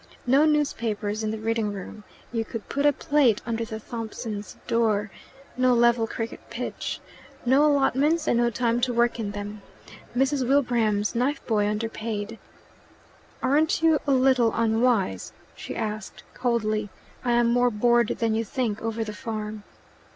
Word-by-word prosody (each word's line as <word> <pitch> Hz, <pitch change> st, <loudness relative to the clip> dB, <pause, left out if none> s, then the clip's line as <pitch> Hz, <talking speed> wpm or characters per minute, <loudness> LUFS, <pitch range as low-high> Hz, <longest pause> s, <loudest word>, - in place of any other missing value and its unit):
No 270 Hz, +5 st, +5 dB
newspapers 225 Hz, -8 st, 0 dB
in 215 Hz, -, -1 dB
the 220 Hz, -, -3 dB
reading 220 Hz, -1 st, -1 dB
room, 205 Hz, +2 st, -8 dB, 0.3 s
you 230 Hz, -2 st, -1 dB
could 225 Hz, -1 st, -7 dB
put 280 Hz, +1 st, +1 dB
a -, -, +6 dB
plate 285 Hz, -7 st, +2 dB
under 230 Hz, 0 st, -2 dB
the 220 Hz, -1 st, -6 dB
Thompsons' 220 Hz, -2 st, -6 dB
door, 215 Hz, -3 st, +1 dB, 0.4 s
no 255 Hz, 0 st, +3 dB
level 235 Hz, -1 st, +3 dB
cricket 225 Hz, 0 st, -5 dB
pitch, -, -, -4 dB, 0.5 s
no 265 Hz, +4 st, +5 dB
allotments 295 Hz, +3 st, +2 dB
and 235 Hz, -, +3 dB
no 240 Hz, 0 st, +3 dB
time 235 Hz, +1 st, 0 dB
to 245 Hz, -1 st, 0 dB
work 235 Hz, 0 st, +2 dB
in 215 Hz, -3 st, -2 dB
them, 205 Hz, +1 st, -6 dB, 0.6 s
Mrs. 270 Hz, -1 st, +1 dB
Wilbraham's 235 Hz, -7 st, +2 dB
knife 270 Hz, +5 st, -1 dB
boy 210 Hz, -3 st, +1 dB
underpaid. 220 Hz, 0 st, -3 dB, 1.0 s
"Aren't 310 Hz, +4 st, +2 dB
you 320 Hz, -2 st, +5 dB
a -, -, +3 dB
little 260 Hz, -3 st, +4 dB
unwise?" 225 Hz, -, +1 dB, 0.2 s
she -, -, -7 dB
asked 215 Hz, -2 st, -5 dB
coldly. 215 Hz, -4 st, 0 dB, 0.3 s
"I 240 Hz, -1 st, +1 dB
am 235 Hz, 0 st, +3 dB
more 245 Hz, +1 st, +3 dB
bored 235 Hz, +1 st, +3 dB
than 230 Hz, -1 st, +1 dB
you 225 Hz, +1 st, 0 dB
think 225 Hz, -2 st, -2 dB
over 225 Hz, 0 st, -2 dB
the 215 Hz, -1 st, -6 dB
farm." 215 Hz, -2 st, -5 dB
230 Hz, 150 wpm, -25 LUFS, 215-255 Hz, 1.0 s, a